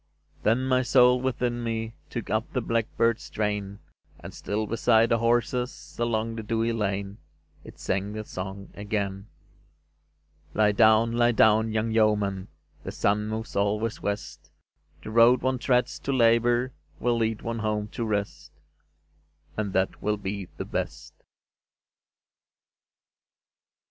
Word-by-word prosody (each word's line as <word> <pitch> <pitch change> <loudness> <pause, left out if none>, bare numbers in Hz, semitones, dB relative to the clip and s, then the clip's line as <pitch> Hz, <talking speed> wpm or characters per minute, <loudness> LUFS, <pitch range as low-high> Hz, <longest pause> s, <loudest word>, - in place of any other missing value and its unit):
Then 115 +4 +2
my 130 -1 +3
soul 125 0 +4
within 120 -2 -1
me 115 -1 -3 0.2
Took - - -5
up - - -1
the - - 0
blackbird's 115 0 0
strain, 105 -2 -3 0.4
And - - -10
still 105 +1 -3
beside 115 +1 +3
the 115 - +2
horses 120 +2 -1
Along 115 -1 -1
the 115 - -4
dewy 115 +1 -1
lane 100 -2 -2 0.4
It - - -13
Sang 95 +2 -2
the 110 0 -5
song 95 +1 -7
again: 100 -1 -3 1.3
"Lie 105 -1 +4
down, 110 +1 +4
lie 120 +1 +3
down, 110 0 +4
young 110 +1 -1
yeoman; 105 -3 +1 0.4
The - - -5
sun 105 +1 0
moves 110 +1 -5
always 105 +3 0
west; 100 -6 -5 0.5
The - - -7
road 120 +2 +5
one 130 -1 0
treads 125 -1 +1
to 140 - -3
labour 120 0 +3 0.3
Will 120 -1 +1
lead 115 -1 -1
one 115 0 -3
home 105 -1 -1
to 120 - -4
rest, 105 -2 -3 1.0
And 105 -2 -2
that 95 0 0
will 105 0 0
be 100 -1 -5
the - - -4
best." - - -5
110 Hz, 135 wpm, -26 LUFS, 105-115 Hz, 1.3 s, road